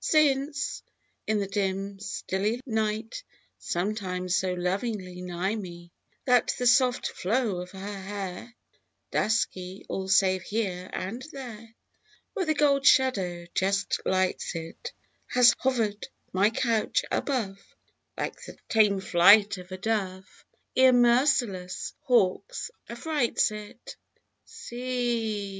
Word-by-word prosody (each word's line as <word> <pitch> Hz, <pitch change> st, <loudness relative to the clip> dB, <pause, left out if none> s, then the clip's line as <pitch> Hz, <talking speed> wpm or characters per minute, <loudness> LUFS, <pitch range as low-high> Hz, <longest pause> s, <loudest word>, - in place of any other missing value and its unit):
Since, 290 Hz, -1 st, +1 dB, 0.5 s
in 215 Hz, -, +2 dB
the 200 Hz, -, -1 dB
dim 195 Hz, 0 st, -2 dB
stilly 205 Hz, +3 st, -2 dB
night 220 Hz, -, -2 dB, 0.4 s
Sometimes 185 Hz, -1 st, -2 dB
so 185 Hz, -1 st, 0 dB
lovingly 185 Hz, 0 st, -3 dB
nigh 180 Hz, +2 st, -2 dB
me, 175 Hz, -5 st, -7 dB, 0.3 s
That 250 Hz, -3 st, +3 dB
the 250 Hz, -, -2 dB
soft 245 Hz, 0 st, +4 dB
flow 215 Hz, 0 st, 0 dB
of 180 Hz, 0 st, -6 dB
her 195 Hz, +1 st, -7 dB
hair 200 Hz, +3 st, -6 dB, 0.6 s
(Dusky, 190 Hz, -3 st, -1 dB
all 190 Hz, 0 st, -3 dB
save 190 Hz, -1 st, +3 dB
here 185 Hz, -4 st, -3 dB
and 225 Hz, +8 st, -4 dB
there 230 Hz, -5 st, -9 dB, 0.6 s
Where 380 Hz, -6 st, -2 dB
the 310 Hz, -, +2 dB
gold 280 Hz, -2 st, +3 dB
shadow 195 Hz, -12 st, +3 dB
just 200 Hz, +1 st, 0 dB
lights 185 Hz, -1 st, 0 dB
it), 165 Hz, -, -7 dB, 0.4 s
Has 250 Hz, -1 st, +6 dB
hover'd 225 Hz, -5 st, 0 dB, 0.3 s
my 195 Hz, +3 st, +4 dB
couch 225 Hz, -1 st, 0 dB
above, 220 Hz, -9 st, -1 dB, 0.6 s
Like -, -, -4 dB
the -, -, -11 dB
tame 210 Hz, -3 st, +4 dB
flight 200 Hz, +3 st, +6 dB
of 180 Hz, +1 st, -12 dB
a 185 Hz, -, -5 dB
dove 190 Hz, -2 st, -3 dB, 0.3 s
Ere 260 Hz, 0 st, +6 dB
merciless 240 Hz, -7 st, +2 dB
hawk 235 Hz, -, +2 dB, 0.4 s
aflrights 245 Hz, -1 st, 0 dB
it! 210 Hz, -1 st, -9 dB, 0.5 s
C. 240 Hz, -3 st, -2 dB
210 Hz, 115 wpm, -27 LUFS, 185-245 Hz, 0.6 s, Has